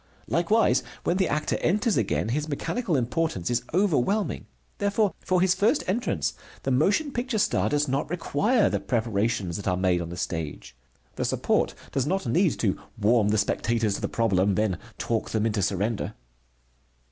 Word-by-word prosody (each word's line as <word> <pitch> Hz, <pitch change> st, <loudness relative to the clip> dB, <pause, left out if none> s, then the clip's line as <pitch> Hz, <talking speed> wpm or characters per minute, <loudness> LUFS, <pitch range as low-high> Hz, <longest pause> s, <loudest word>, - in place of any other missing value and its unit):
Likewise, 175 Hz, +9 st, +3 dB, 0.2 s
when 175 Hz, -, +1 dB
the 190 Hz, -2 st, +2 dB
actor 150 Hz, +1 st, 0 dB
enters 210 Hz, +5 st, +1 dB
again, 110 Hz, -1 st, 0 dB
his 150 Hz, +5 st, -1 dB
mechanical 180 Hz, -, -1 dB
importance 125 Hz, -, -1 dB
is 120 Hz, 0 st, +1 dB
overwhelming. 185 Hz, -, +1 dB, 0.3 s
Therefore, 200 Hz, 0 st, +1 dB
for 185 Hz, -1 st, +1 dB
his 185 Hz, -1 st, +4 dB
first 210 Hz, +10 st, +2 dB
entrance 185 Hz, -, -1 dB, 0.3 s
the 135 Hz, -, 0 dB
motion 205 Hz, -, +2 dB
picture 240 Hz, -2 st, -2 dB
star 210 Hz, -, +2 dB
does 150 Hz, 0 st, +1 dB
not 135 Hz, +3 st, -1 dB
require 195 Hz, -, +2 dB
the 100 Hz, -, 0 dB
preparations 105 Hz, -3 st, -1 dB
that 100 Hz, -, -6 dB
are 90 Hz, -1 st, +1 dB
made 90 Hz, -2 st, +2 dB
on 85 Hz, -, -5 dB
the 85 Hz, -, -7 dB
stage. 80 Hz, -8 st, -4 dB, 0.4 s
The -, -, -1 dB
support -, -, +1 dB, 0.2 s
does 135 Hz, 0 st, 0 dB
not 190 Hz, +4 st, 0 dB
need 165 Hz, +7 st, +2 dB
to 100 Hz, -5 st, +1 dB, 0.2 s
warm 110 Hz, 0 st, +3 dB
the 110 Hz, -, +2 dB
spectators 110 Hz, +1 st, +1 dB
to -, -, -4 dB
the -, -, -2 dB
problem, 100 Hz, -4 st, +2 dB
then 105 Hz, -3 st, 0 dB, 0.2 s
talk 115 Hz, -1 st, -2 dB
them 110 Hz, -1 st, 0 dB
into 105 Hz, -2 st, 0 dB
surrender. 100 Hz, +3 st, -1 dB
125 Hz, 170 wpm, -26 LUFS, -, 0.4 s, his